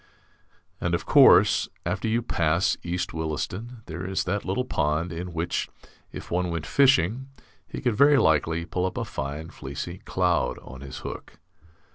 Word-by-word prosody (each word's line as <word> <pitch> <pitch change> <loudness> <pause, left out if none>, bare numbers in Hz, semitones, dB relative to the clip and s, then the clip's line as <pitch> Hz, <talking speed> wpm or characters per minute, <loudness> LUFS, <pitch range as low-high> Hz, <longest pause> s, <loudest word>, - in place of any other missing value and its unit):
And, - - 0
of - - -4
course, - - +6 0.2
after - - -1
you 115 +2 +1
pass 85 -3 +1
East 90 +1 -3
Williston 90 - -4
there 85 +2 -6
is 95 +1 -1
that 100 +2 -2
little 100 +7 -1
pond 80 -3 -1
in 90 +2 -5
which, 85 +1 -2 0.4
if - - -9
one 90 +1 0
went 85 -2 -3
fishing, 130 -3 +3 0.4
he - - -7
could 120 -3 +1
very 145 +2 +6
likely 80 - +2
pull 90 +1 -1
up 95 - -6
a - - -2
fine 75 +4 -5
fleecy 75 +6 -6
cloud 90 -2 0
on 65 0 -11
his 70 -2 -8
hook. - - -8
90 Hz, 160 wpm, -26 LUFS, 80-105 Hz, 0.4 s, course